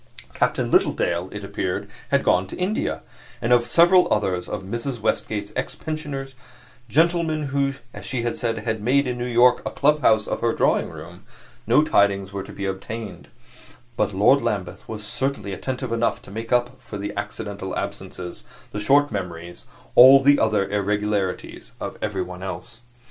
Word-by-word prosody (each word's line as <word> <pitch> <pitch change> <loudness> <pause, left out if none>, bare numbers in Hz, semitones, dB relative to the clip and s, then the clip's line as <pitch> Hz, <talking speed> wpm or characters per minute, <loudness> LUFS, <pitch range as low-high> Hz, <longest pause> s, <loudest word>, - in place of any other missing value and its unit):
Captain - - 0
Littledale, 85 +2 +2
it 105 0 -7
appeared, 95 -2 -3 0.2
had - - +2
gone 95 +1 +2
to - - -7
India; 185 +4 -1 0.4
and 120 +2 +2
of 120 -1 +3
several 175 +1 +5
others 95 -4 0
of 105 -2 -4
Mrs. 120 +5 -4
Westgate's 105 -1 -2
ex 130 - -3
pensioners 145 -4 -5 0.6
gentlemen 160 0 +2
who, 140 0 +1 0.2
as - - -9
she 125 -3 -3
said, 115 -1 -2
had 110 0 -3
made, 135 +6 +3
in 125 -1 -3
New 120 - -2
York, 120 +1 +4
a - - -2
clubhouse 140 -7 +3
of - - -3
her 115 -1 +2
drawing - - +2
room - - -11 0.4
no 125 +7 +5
tidings 100 -7 +2
were 100 - -3
to 95 - -10
be 100 - -5
obtained; 95 0 -6 0.7
but - - +1
Lord 125 +9 +4
Lambeth 95 -2 -3
was 105 -1 -6
certainly 105 -4 -3
attentive 130 +5 -4
enough 115 0 0
to - - -12
make 115 +2 -6
up 125 +1 +1
for 105 - -8
the 100 +1 -4
accidental 100 -2 -5
absences, 95 -3 -6 0.3
the 105 - -4
short 140 +6 +3
memories, 85 -3 -6 0.3
all 130 +2 +9
the 145 +1 +5
other 105 -3 +2
irregularities 105 -1 -2
of - - -5
everyone 90 0 -3
else. 95 +5 -7
110 Hz, 165 wpm, -23 LUFS, 100-130 Hz, 0.7 s, all